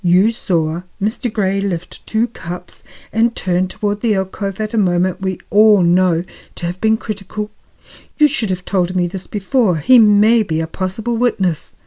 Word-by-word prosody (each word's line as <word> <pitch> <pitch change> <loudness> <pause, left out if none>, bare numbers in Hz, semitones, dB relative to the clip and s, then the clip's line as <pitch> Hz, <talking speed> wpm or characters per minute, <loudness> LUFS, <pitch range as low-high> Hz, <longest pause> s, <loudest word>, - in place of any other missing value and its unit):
"You 185 +5 +4
saw 170 -6 -1 0.2
Mr. 220 +4 -2
Grey 195 -2 0
lift 175 -4 -5
two 220 +1 +1
cups 180 -4 -9 0.3
and 230 +1 +2
turn 185 0 0
toward 205 +2 -3
the 225 -3 +2
alcove 195 +1 -3
at 215 0 -3
a - - -1
moment 180 -1 +1
we 190 -1 -2
all 210 -2 +6
know 175 -1 +3 0.3
to - - -5
have 175 +2 -5
been 220 0 +3
critical? 210 0 -6 0.7
You 300 - +6
should 250 -8 -2
have 180 -1 -3
told 185 -2 0
me 180 -1 +2
this 180 +1 -6
before. 210 -1 +1
He 240 - +5
may 215 +1 +5
be 160 -7 -2
a 160 - -1
possible 195 +7 -3
witness." 195 -9 -1
195 Hz, 175 wpm, -17 LUFS, 180-220 Hz, 0.7 s, all